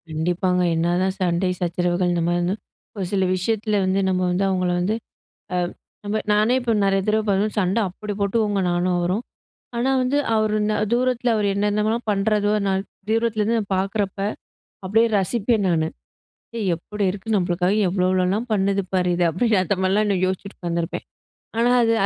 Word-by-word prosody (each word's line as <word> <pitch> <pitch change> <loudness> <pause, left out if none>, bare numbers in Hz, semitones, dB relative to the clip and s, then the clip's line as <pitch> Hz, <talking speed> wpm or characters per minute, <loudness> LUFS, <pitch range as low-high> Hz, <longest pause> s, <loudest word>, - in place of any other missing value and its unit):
கண்டிப்பாங்க. 180 +3 0
என்னாதான் 175 +3 +1
சண்டை, 180 +1 +1
சச்சரவுகள் 175 +1 0
இந்தமாரினா, 175 +1 0 0.4
ஒரு 195 -3 -3
சில 195 -2 +1
விஷயத்தில 210 +2 0
வந்து 190 +1 +1
நம்ம 185 0 +1
வந்து 180 +2 0
அவுங்கள 185 -1 0
வந்து 200 +5 0 0.6
அ - - +1 0.5
நம்ம 205 +1 -1
நானே 215 +4 +3
இப்ப 240 -2 0
நிறைய 195 0 +2
தடவ 215 +1 +2
பாத்தோன்னா. 205 +2 +1
சண்ட 190 0 +1
அப்பிடி 205 +3 -6
போட்டுக்குவங்க 205 0 +1
நானும், 175 +1 +1
அவரும். 180 +6 0 0.5
ஆனா 245 +3 +1
வந்து 260 +3 +1 0.2
அவரு 215 -1 +1
இன்ன 215 0 +1 0.2
தூரத்தில 245 0 +1
அவரு 210 -1 +1
என்னென்னலாம் 210 +3 0
பண்றதோ! 205 +1 +1
நான் 190 0 +1 0.3
தூரத்திலேருந்து 225 0 +1
நான் 205 -3 -4
பாக்கிறப்ப, 195 +1 -1 0.7
அப்பிடியே 225 +5 +3
ரசிப்பேன் 215 +2 +1
நானு. 160 -2 +1 0.9
எப்புடி 205 +5 -5
இருக்கு 205 +3 -4
நம்மளுக்காக 180 0 +1 0.2
எவ்ளோ, 180 0 0
எவ்வளோலாம் 185 +5 +1
பண்ணுது 200 -1 +1
பாரு 180 -1 +2
இது, 175 - +1
அப்பிடின்னு 205 +5 +2
அந்தமாரிலாம் 190 +2 +1
இன்னும் 190 -3 +1
யோசிச்சுட்டு 190 +2 -5
உக்காந்திருப்பேன். 170 -1 -3 0.5
ஆனா, 235 +1 +3
அது 230 0 +3
195 Hz, 150 wpm, -22 LUFS, 180-215 Hz, 0.9 s, நானே